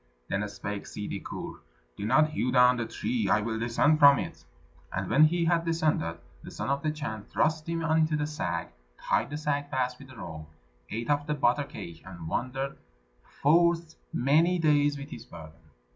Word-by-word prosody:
Then 100 +1 -1
spake 100 0 -5
Ssidi 105 - -5
Kur, - - -7 0.4
"Do 100 - -5
not 155 +6 +4
hew 125 -4 -1
down 125 0 +5
the 115 -1 -2
tree; 240 -2 -1
I 105 - +4
will 110 +1 -2
descend 120 +7 +2
from 140 -1 +8
it." - - -5 0.5
And 95 0 -2
when 155 - +7
he 170 +2 +1
had 165 0 +2
descended, 155 - 0 0.2
the - - -9
Son - - -3
of 140 0 0
the 155 - 0
Chan 145 -9 -5
thrust 155 +1 0
him 165 0 -1
into 160 -1 +2
the 150 0 0
sack, 85 - -3 0.3
tied - - 0
the 145 - -4
sack 145 -1 -1
fast 125 -3 -1
with 135 - -12
the 130 -3 -14
rope, 80 -5 -8 0.4
ate 115 +6 -2
of 145 0 0
the 150 - 0
butter 140 0 +2
cake, 85 - -9
and 85 -3 -9
wandered 135 +8 -3 0.6
forth 165 +2 +4 0.2
many 160 +8 +3
days 145 -3 +3
with 140 +1 -9
his 115 - -8
burden. 80 -1 -13
140 Hz, 190 wpm, -28 LUFS, 110-155 Hz, 0.6 s, from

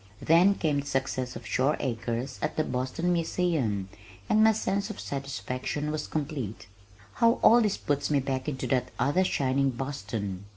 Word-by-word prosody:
Then 175 +5 +5
came 150 -6 0
the 140 - -5
success 130 -2 -2
of 115 - -8
Shore 135 +4 +1
Acres 120 +1 -3
at 150 - -2
the 155 - +3
Boston 130 +7 -1
Museum 160 - 0 0.4
and 215 -1 +4
my 220 - +7
sense 200 -1 -1
of 215 - -7
satisfaction 140 +2 -3
was 150 -1 -3
complete. 140 - -4 0.6
How 230 0 +6
all 235 +2 +7
this 210 -3 +1
puts 145 -1 -1
me 145 -2 +3
back 135 +1 -2
into 130 -3 -4
that 130 -1 +1
other 160 +7 +2
shining 135 -5 +1
Boston! 105 -7 -4
140 Hz, 165 wpm, -28 LUFS, 125-165 Hz, 0.6 s, my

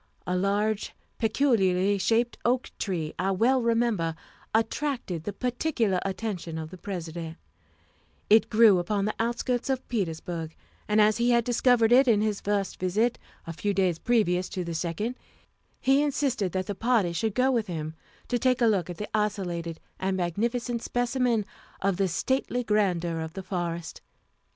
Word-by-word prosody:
A 180 - -1
large, 200 +3 0 0.2
peculiarly 205 -5 +2
shaped 230 +5 +1
oak 250 +1 +1
tree, 165 -6 -2
I 190 +1 +1
well 235 +7 +3
remember, 230 -8 +1 0.4
attracted 225 - -1
the - - -2
particular 240 - 0
attention 190 -4 -4
of 160 0 -6
the 185 - -9
President; 170 -3 -6 0.9
it 220 +1 +5
grew 215 -4 +6
upon 200 +3 -1
the 215 - -1
outskirts 240 +2 -1
of 260 -1 -1
Petersburg, 165 -6 -3 0.3
and 210 0 +2
as 215 0 +5
he 240 +1 +2
had 235 -1 +4
discovered 240 -1 +3
it 260 +2 +6
on 215 -3 +4
his 210 -2 -1
first 200 -1 -1
visit, 210 +7 +1 0.3
a 165 - -5
few 200 +4 -2
days 180 -4 +1
previous 185 -7 +1
to 185 -3 -3
the 170 -1 -4
second, 175 +9 -3 0.6
he 270 +2 +3
insisted 270 -9 0
that 185 +1 -2
the 205 - -3
party 220 -5 +1
should 210 +5 -1
go 255 +1 +3
with 230 -4 0
him 160 -3 -4 0.3
to 245 - 0
take 255 +1 +2
a 240 - +4
look 195 -6 +2
at 175 - -6
the 210 - -4
isolated 175 -6 -2 0.2
and 190 0 -1
magnificent 235 +7 -1
specimen 245 -3 0 0.3
of 195 -2 0
the 195 -1 +2
stately 250 +6 -1
grandeur 180 -6 +1
of 160 0 -5
the 190 - -6
forest. 170 -3 -4
205 Hz, 160 wpm, -27 LUFS, 180-235 Hz, 0.9 s, grew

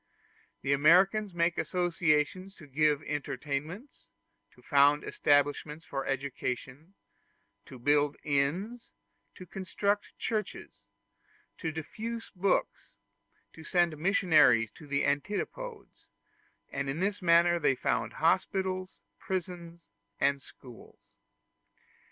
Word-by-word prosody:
The 140 +1 +2
Americans 185 +7 +4
make 170 0 +1
associations 175 +1 0
to 155 - -14
give 150 +1 +1
entertainments, 145 - -5 0.5
to - - -21
found 145 0 +4
establishments 145 +2 +1
for 135 -1 -4
education, 135 +4 -4 0.7
to 130 - -10
build 145 +3 +2
inns, 165 +12 -1 0.5
to 185 - -10
construct 200 +3 -2
churches, 210 - -4 0.8
to 160 - -2
diffuse 225 +9 -6
books, 190 +2 -1 0.6
to 160 - -12
send 175 -1 +1
missionaries 150 - +4
to 150 - -14
the 140 0 0
antipodes; 210 - -4 0.6
and 140 0 -3
in 140 +4 -3
this 200 +2 -1
manner 170 0 +4
they 140 -4 +2
found - - -1
hospitals, 185 +2 0 0.2
prisons, 175 - -6 0.3
and 140 -1 +2
schools. 125 -3 -15
160 Hz, 100 wpm, -30 LUFS, 140-185 Hz, 0.8 s, Americans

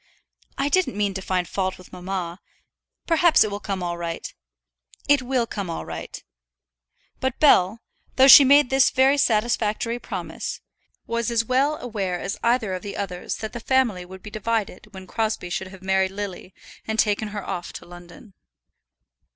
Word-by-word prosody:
"I 275 - 0
didn't 355 - +1
mean 205 -1 0
to 190 - -5
find 185 -2 -1
fault 190 0 -2
with 185 - -16
mamma. 180 -1 -5 0.7
Perhaps 330 0 +5
it 215 - -3
will 200 - -4
come 195 -3 -4
all 175 -1 -3
right." 170 -1 -5 0.7
"It 285 -1 +4
will 250 -1 0
come 200 -5 -5
all 165 - -5
right." - - -8 1.0
But 260 -2 -2
Bell, 220 -7 +4 0.3
though 265 0 +6
she 275 - +11
made 280 0 +5
this 265 0 +5
very 270 +2 +3
satisfactory 230 -1 0
promise, - - -6 0.5
was 235 0 -2
as 230 -1 +1
well 275 +5 +1
aware 195 -7 -3
as 195 - -4
either 235 -4 +1
of 185 - -4
the 200 - -7
others 180 -3 -4
that 215 - -7
the 240 - -5
family 235 -7 +1
would 185 +1 -12
be 210 - -9
divided 215 -1 -3
when 190 -2 -10
Crosbie 215 -3 -2
should 190 +1 -3
have 190 0 -13
married 190 0 +2
Lily 195 -1 -7 0.3
and 220 0 -2
taken 215 0 +1
her 205 -1 -6
off 175 -1 -4
to - - -9
London. 175 +4 -14
210 Hz, 170 wpm, -23 LUFS, 185-245 Hz, 1.0 s, she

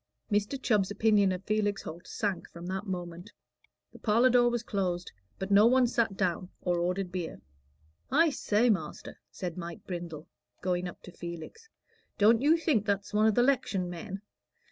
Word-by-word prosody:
Mr. 210 +6 0
Chubb's 210 -7 +2
opinion 205 -1 +3
of 185 +1 -4
Felix 205 -1 0
Holt 170 +3 -8
sank 200 -4 -3
from 170 +1 -10
that 190 +3 -4
moment. 175 +1 -5 0.6
The - - -13
parlor 235 +4 +4
door 245 0 +5
was 240 -1 -2
closed, 180 -5 -2 0.3
but 190 +1 -4
no 205 +3 +7
one 255 +1 +5
sat 230 -4 0
down 185 -1 -1
or 175 -1 0
ordered 180 +1 -1
beer. 180 -3 -4 0.7
"I 320 +3 +4
say, 230 -2 +2
master," 160 -7 -4
said 180 -2 -5
Mike 170 -1 -7
Brindle, 170 -4 -6 0.3
going 180 -1 -1
up 175 - -10
to 180 - -10
Felix, 170 - -8 0.5
"don't 225 +3 +5
you 310 +4 +5
think 300 - +1
that's 205 -1 -1
one 215 +1 +4
o' - - +5
the 240 +3 +3
'lection 230 -9 +1
men?" 195 +3 -7
200 Hz, 170 wpm, -30 LUFS, 180-225 Hz, 0.7 s, no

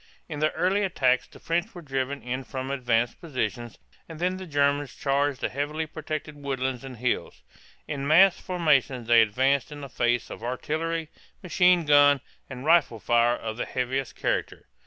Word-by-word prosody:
In 150 -3 -6
the 155 +1 +2
early 190 +3 +1
attacks 130 -10 +1
the - - -16
French 175 +6 -2
were 175 - -8
driven 135 0 -3
in 130 +2 -3
from 130 0 -5
advanced 120 -3 0
positions, 120 - -4 0.3
and 165 - -8
then 180 +3 -1
the 185 -1 -8
Germans 145 -2 0
charged 140 -1 0
the - - -1
heavily 145 +4 -3
protected 155 -1 -6
woodlands 130 -2 -3
and 130 -2 -8
hills. 125 +2 -2 0.4
In 140 -2 -3
massed 180 +5 +5
formation 150 -8 +1
they 115 0 +6
advanced 130 +7 +1
in 145 0 -8
the 140 - -8
face 120 -1 0
of - - -8
artillery, 160 +6 -3 0.3
machine 180 -1 +3
gun, 145 -1 +6 0.3
and 130 0 -8
rifle 155 -8 +3
fire 120 +2 +3
of 110 -2 -6
the - - -2
heaviest 130 +1 -2
character. - - -2
140 Hz, 170 wpm, -26 LUFS, 125-155 Hz, 0.4 s, they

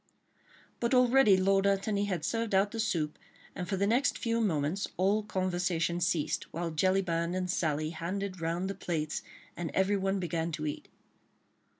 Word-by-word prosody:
But 235 +2 +1
already 250 -5 +6
Lord 195 +1 +3
Antony 200 +1 +1
had 180 -6 -2
served 225 -1 -1
out 200 +2 +3
the 225 - -5
soup, 160 -8 -1 0.3
and 180 -1 -5
for 195 - 0
the 200 - +2
next 240 +7 +2
few 230 0 0
moments 170 -1 0
all 195 +4 +2
conversation 180 -3 -1
ceased, 160 -3 0
while 170 0 -3
Jellyband 175 0 +1
and 185 0 -1
Sally 155 -3 0
handed 185 +2 -4
round 170 +3 -1
the 195 - -2
plates 160 -5 -3 0.3
and 175 -2 -3
everyone 195 0 +1
began 170 -2 -2
to 155 0 -3
eat. 150 - -4
185 Hz, 160 wpm, -30 LUFS, 170-200 Hz, 0.3 s, already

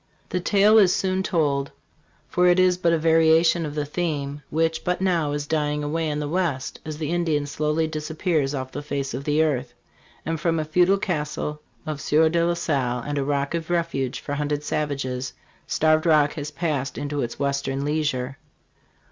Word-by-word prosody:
The 180 - -1
tale 205 +4 +5
is 190 -3 +5
soon 190 0 0
told; 145 -7 0 0.6
for 180 0 +2
it 175 0 +5
is 185 -1 +4
but 175 -1 +1
a 165 - +3
variation 160 +1 +4
of 145 - -7
the 150 -1 -1
theme 145 -3 -3
which 160 0 0
but 180 0 0
now 175 -6 +1
is 145 0 -2
dying 150 -1 -1
away 160 +2 -1
in 150 - -2
the 150 0 -2
west, 155 -5 -2
as 155 -1 -6
the 155 0 -3
Indian 165 -4 0
slowly 150 +2 0
dis 155 -1 -5
appears 155 -4 0
off 130 -1 -4
the 145 - -5
face 140 -2 -3
of 135 +3 -5
the 150 +1 +3
earth. 125 -5 -1 0.5
And 165 0 -2
from 165 0 +1
a 155 - -1
feudaLcastle 155 -3 0 0.3
of 150 -2 -4
Sieur 160 +2 +3
de 170 +1 +1
la 170 0 +1
Salle 125 -7 -1
and 145 -1 -2
a - - +1
Rocjjjoi 145 +4 -1
Refuge 150 -7 -1
for 145 - -5
hunted 145 0 -1
savages, 135 -4 -2 0.3
Starved 155 +1 +2
Rock 150 -2 +4
has 145 -2 -5
passed 150 -5 -2
into 145 0 -2
its 120 - -4
"western 140 0 -1
leisure." 145 -4 -1
150 Hz, 185 wpm, -24 LUFS, 145-165 Hz, 0.6 s, tale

